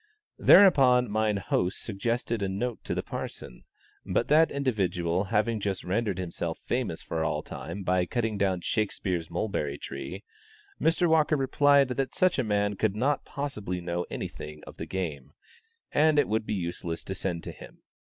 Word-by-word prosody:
Thereupon 125 - +6
mine 110 -1 +1
host 90 0 -1
suggested 115 +2 -2
a 100 - 0
note 110 +5 -3
to - - -2
the - - -2
parson, - - -7 0.4
but - - 0
that 160 +2 +6
individual 95 -9 0
having 110 +2 +1
just 100 -2 -2
rendered 100 +1 -1
himself 85 -2 -3
famous 120 -9 -3
for 80 -1 -2
all - - -1
time 85 +7 -7
by 90 -1 +1
cutting 115 -1 -1
down 95 -3 0
Shakspeare's 95 -5 -1
mulberry 85 -6 -2
tree, 70 +9 -7 0.6
Mr. 170 +2 +3
Walker 155 -1 +3
replied 140 0 +4
that 130 +1 -2
such 185 -6 +3
a - - +2
man 105 -2 0
could 105 -1 +1
not 140 +6 0
possibly 105 -11 -4
know 85 0 -3
anything 75 0 -6
of - - -12
the - - -6
game, 75 -7 -4 0.6
and 155 0 +4
it 145 - +4
would 110 0 -1
be 105 - -1
useless 85 -2 -4
to 95 - -5
send 90 -3 -3
to - - -6
him. - - -14
105 Hz, 165 wpm, -28 LUFS, 90-125 Hz, 0.6 s, Thereupon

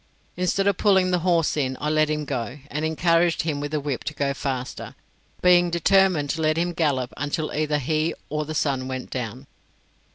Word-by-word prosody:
Instead 180 +2 0
of 200 -2 +2
pulling 190 -3 +3
the 180 - +2
horse 170 -2 +2
in, 130 -3 -1
I 150 - -2
let 155 0 +3
him 150 -1 -1
go, 125 -1 -4
and 150 +1 -2
encouraged 165 +2 +2
him 155 -3 -2
with 145 0 -3
the 155 0 -1
whip 140 -3 -3
to 155 - -4
go 140 -1 0
faster, 130 -2 -5 0.5
being 175 -1 +5
determined 170 -3 +3
to 165 - -3
let 155 0 +2
him 175 +1 0
gallop 140 -7 0
until 145 +2 -2
either 150 0 0
he 155 +3 0
or 150 +1 -2
the 155 +1 -6
sun 135 -4 0
went 130 -1 -5
down. 125 +1 -5
155 Hz, 195 wpm, -24 LUFS, 140-170 Hz, 0.5 s, being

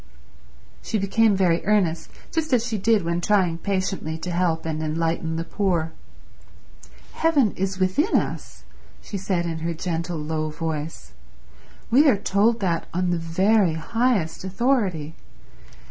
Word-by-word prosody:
She 220 - -2
became 210 +2 +3
very 175 -3 +2
earnest, 190 -6 +1 0.2
just 320 -3 -1
as 235 -2 +3
she 225 -3 -2
did 220 0 +3
when 170 +1 -1
trying 180 -4 +2
patiently 185 -4 -2
to 175 +2 -5
help 170 -2 0
and 155 -1 -2
enlighten 165 +1 -1
the 165 - -2
poor. 170 -3 -1 1.2
"Heaven 290 -10 +2
is 190 0 -3
within 190 - +1
us," - - -2 0.4
she 200 - -5
said 185 -2 -1
in 165 -1 -3
her 165 +1 -3
gentle 170 0 -3
low 155 0 -2
voice. 155 - -5 0.8
"We 285 +6 +6
are 210 - +3
told 210 +4 +2
that 170 -4 -1
on 180 0 +1
the 175 - 0
very 185 +3 +2
highest 225 -1 0
authority. 190 - 0
180 Hz, 140 wpm, -24 LUFS, 165-210 Hz, 1.2 s, We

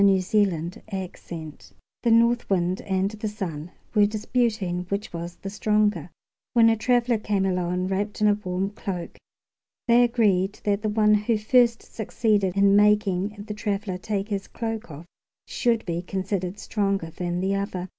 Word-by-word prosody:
Orthographic 190 -1 0
version 160 -3 -7 0.4
The 235 - +1
North 235 +1 +3
Wind 185 -1 +1
and 190 0 0
the 215 0 -5
Sun 175 -7 -5 0.2
were 210 -2 +5
disputing 215 -4 -1
which 200 -1 -3
was 170 +1 -5
the 195 - -7
stronger, 210 -5 +1 0.4
when 230 -2 +6
a 225 - +3
traveler 240 0 +2
came 205 -2 0
along 180 -1 0
wrapped 200 +2 -2
in 210 - +4
a 205 - +5
warm 195 -1 -3
cloak. 185 -4 -6 0.7
They 240 +1 +6
agreed 210 -5 +2
that 205 0 +1
the 215 - -1
one 210 0 +3
who 210 +2 +2
first 235 +2 +3
succeeded 205 -3 0
in 200 0 +5
making 205 -1 +2
the 210 - -4
traveler 205 -3 -3
take 205 +1 -3
his 200 -2 -3
cloak 225 -2 -5
off 155 +2 -9 0.4
should 235 -2 0
be 170 -1 -2
considered 190 0 -3
stronger 195 -7 -1
than 175 +1 -3
the 190 +2 0
other. 195 -2 -3
200 Hz, 155 wpm, -25 LUFS, 185-215 Hz, 0.7 s, when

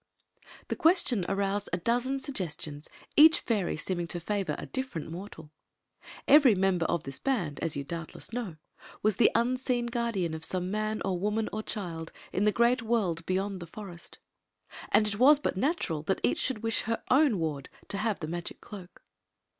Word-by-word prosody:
The - - 0
question 315 - +3
aroused 200 +1 -1
a - - +1
dozen 240 +8 0
sugge^ons, 165 - -5 0.3
each 315 +2 +7
Mry 200 -9 0
seeming 175 0 -2
to 175 - -3
£ivor 190 -3 -2
a - - -5
difiermt 260 - -4
mortal 165 -4 -9 0.8
Evary 280 -8 +7
member 185 -3 +2
oi - - +2
diis 135 -4 -8
band, 200 - -1
as 165 -2 -2
you 140 - -3
doubtless 165 +7 -6
know, 225 -9 -3 0.5
was 215 -2 +2
the - - +6
unseen 245 +1 +1
guardian 230 -8 -1
of 160 0 -6
some 180 +1 -2
man 215 +1 -1
or 185 -2 -1
woman 210 +3 0
or 215 - -2
child 170 -7 -5 0.2
in 200 - +1
the 210 - +5
great 240 +3 +3
world 210 -8 0
beyond 190 +1 -1
the 175 - -8
forest, 175 -2 -10 0.7
and 215 - +5
it 200 -1 -1
Sut 285 0 +5
natural 190 - 0
that 190 +5 -1
each 120 0 +2
should 245 -5 -2
wish 225 0 +2
her 230 - -1
own 270 -4 +5
wax 150 -5 -3 0.2
y 200 - -2
have 215 -3 -1
the 155 - -3
magic 170 +1 -5
cloak. 190 -4 -11
200 Hz, 175 wpm, -29 LUFS, 170-235 Hz, 0.8 s, each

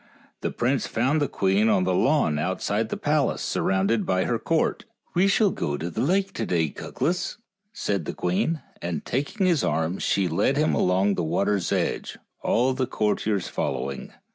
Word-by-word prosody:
The - - -2
prince 130 +2 0
found 135 +7 +1
the 145 - +2
queen 100 +2 +2
on 95 - +3
the 90 0 +1
lawn 110 - +2
outside 100 +6 -1
the - - -3
palace 150 -1 +1
surrounded 95 +4 +1
by 95 0 +1
her - - 0
court. - - 0
" - - -41
We 180 +3 +3
shall 200 0 +3
go 70 - -2
on - - -1
the 85 +2 -3
lake 190 +5 +1
to 115 - -2
day, 80 -3 +1
Cuglas," 180 +3 -2 0.3
said 100 - -2
the - - -4
queen, 95 - 0 0.2
and 85 -1 -3
taking 145 - -1
his 170 -5 +3
arm 80 +4 0
she 95 -2 +1
led 90 - +1
him 155 +1 +2
along 95 +2 +2
the 90 - -1
water's 100 +3 0
edge, - - -1 0.2
all 130 +3 +2
the 130 -1 -1
courtiers 105 -2 0
following. 70 0 -3
105 Hz, 180 wpm, -25 LUFS, 90-145 Hz, 0.3 s, on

